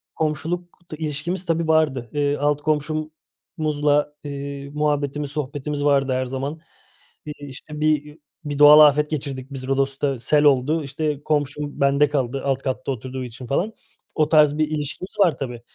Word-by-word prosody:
komşuluk 170 +3 -3
t 155 - -7
ilişkimiz, 160 +4 -3
tabii, 165 -1 0
vardı. 150 -7 +2
Eee, 145 0 +1
alt 145 0 +1
komşumuzla, 150 -1 -1
eee, 140 -1 -6
muhabbetimiz, 145 -1 -1
sohbetimiz 145 0 -3
vardı 140 -2 +3
her 130 0 0
zaman. 135 +4 -4 0.7
İii, 145 -1 -8
işte 150 +3 -9
bir, 155 -1 +2
iii, 150 +1 -15 0.2
bir 145 -1 -4
doğal 150 +1 +9
afet 150 0 +6
geçirdik 135 -4 -4
biz 130 -1 -6
Rodos'ta, 135 0 0
sel 145 +6 +2
oldu. 145 +3 +3
İşte 145 +1 -3
komşum 145 -1 -2
bende 140 +1 +4
kaldı 135 -2 -1
alt 135 -1 0
katta 130 +1 -2
oturduğu 130 +1 -5
için 125 +1 -9
falan. 180 - 0 0.4
O 155 -1 +2
tarz 150 -2 +5
bir 155 0 +2
ilişkimiz 155 +6 -5
var, 180 -5 +4
tabii, 120 -3 -5
145 Hz, 155 wpm, -22 LUFS, 135-155 Hz, 0.7 s, doğal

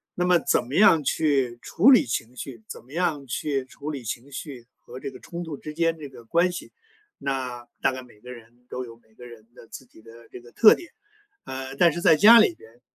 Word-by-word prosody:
那 180 - -1
么 180 -1 +4
怎 140 - 0
么 130 - -9
样 175 -6 +5
去 135 -6 0
处 220 +11 +4
理 255 - +6
情 115 +2 -4
绪， 120 -3 -9
怎 - - -10
么 130 +4 -17
样 155 -5 -1
去 135 +2 -2
处 145 +3 -8
理 140 -4 -7
情 120 +4 -6
绪 135 -3 -8
和 130 - -11
这 135 - -6
个 - - -13
冲 170 0 -7
突 160 -3 -6
之 150 +2 -9
间 165 0 +1
这 145 -2 -8
个 120 -3 -15
关 170 +8 +2
系， 175 - -8 0.5
那 125 -3 -4
大 135 - +2
概 130 0 -7
每 120 -4 -18
个 125 +3 -11
人 120 +1 -17
都 130 - -5
有 115 -2 -12
每 110 -1 -31
个 125 +2 -13
人 115 -2 -15
的 115 - -16
自 130 - -11
己 110 - -20
的 115 +1 -16
这 125 - -11
个 120 0 -17
特 220 - +7
点。 345 - -9 0.5
呃， 130 0 -7
但 170 +4 +4
是 175 - -5
在 160 - +6
家 220 +8 +8
里 215 -6 +3
边 115 +2 -19
135 Hz, 255 characters per minute, -24 LUFS, 120-165 Hz, 0.5 s, 家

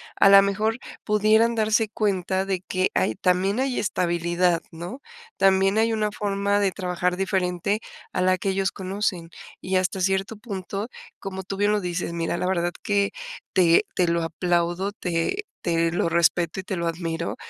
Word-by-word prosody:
a 195 - +6
la 195 0 +9
mejor, 215 +3 0 0.3
pudieran 215 +2 +3
darse 220 0 +2
cuenta 190 -3 0
de 190 -2 -2
que, 185 0 -1
hay 110 - +1
también 185 - +1
hay 265 -1 0
estabilidad, 175 -2 +1
¿no? 175 +11 -8 0.4
También 195 +1 +3
hay 225 +1 +2
una 215 -1 0
forma 200 0 0
de 200 -2 +2
trabajar 180 -1 -1
diferente 190 +1 0 0.3
a - - 0
la 185 0 +3
que 195 - -2
ellos 190 -1 0
conocen, 190 -2 -7 0.7
y 185 0 0
hasta 185 +1 -1
cierto 195 +3 0
punto, 200 -1 -5 0.3
como 190 -1 -6
tú 195 - -5
bien 205 +1 +2
lo 210 - +2
dices, 180 -2 -3
mira, 170 0 -2
la - - -2
verdad 175 -2 0
que 200 -1 +1 0.4
te 170 -3 +4
te 180 - +2
lo 170 0 +1
aplaudo, 175 +3 0
te 180 - -2 0.2
te 165 -1 +1
lo 170 0 0
respeto 170 +1 +2
y - - -5
te 190 - -4
lo 170 -1 -2
admiro. 165 0 -3
190 Hz, 170 wpm, -24 LUFS, 175-205 Hz, 0.7 s, la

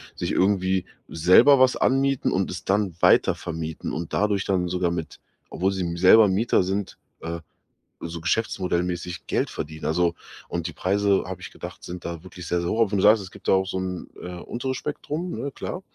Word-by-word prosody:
sich - - -3
irgendwie 95 -1 +1 0.2
selber 95 - +6
was 130 0 +5
anmieten 135 0 +1
und 95 0 0
es 90 - -6
dann 95 -3 +1
weitervermieten 80 -1 +1
und 80 +1 -5
dadurch 100 -1 +1
dann 90 -2 +1
sogar 90 -1 0
mit 85 -2 -5 0.3
obwohl 95 +2 0
sie 95 -1 -3
m 85 -1 -2
selber 100 +5 +7
Mieter 100 +1 +2
sind, 95 +2 -3 0.2
äh, 85 +1 -4 0.7
so 85 0 -5
geschäftsmodell-mäßig 90 -2 -2
Geld - - 0
verdienen. 80 +1 -6
Also, 85 +2 +2 0.4
und 85 -1 -3
die 85 - -7
Preise, 100 +2 +1
habe 95 -1 -6
ich 90 - -9
gedacht, - - -9
sind 90 0 -7
da 85 -1 -5
wirklich 90 -1 -10
sehr, 90 - +1
sehr 85 0 -2
hoch. 110 -2 +2
Wenn 100 - +1
du - - +1
sagst, 105 0 +6
es 95 - -11
gibt - - -13
da - - +5
auch 95 0 +3
so 95 0 -4
'n, 90 -1 -4
äh, 90 0 -7
unteres 130 +2 -4
Spektrum, 150 +5 -4
ne, 140 - -3
klar, 180 - -6
95 Hz, 195 wpm, -24 LUFS, 85-105 Hz, 0.7 s, selber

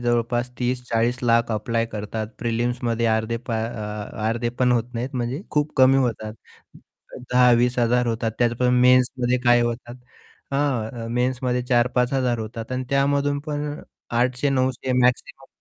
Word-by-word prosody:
जवळपास 120 0 0
30-40 125 -1 -1
लाख 115 0 +2
अप्लाय 115 +2 -1
करतात 105 +1 -4
प्रिलिम्समध्ये 120 0 -1
अर्धे 110 +1 -2
पा 115 - 0
अ 105 -1 -5
अर्धे 120 +1 -1
पण 125 -1 +4
होत 120 0 -1
नाहीत 125 +4 -4
म्हणजे 125 +6 -3
खूप 150 0 0
कमी 130 +1 +6
होतात. 115 -5 -1 1.0
10,000-20,000 125 0 +3
होतात 115 0 -1
त्यातून 125 +1 +2
मेन्समध्ये 125 0 +3
काय 120 0 +5
होतात. 120 0 -4 0.6
हां, 120 -5 -1
मेन्समध्ये 125 0 0
4000-5000 125 0 +1
होतात 115 +2 -6
आणि 130 0 -2
त्यामधून 140 +1 +1
पण 150 0 -3 0.4
800-900 130 0 0
मॅक्सिमम 125 0 0
120 Hz, 125 wpm, -23 LUFS, 115-130 Hz, 1.0 s, कमी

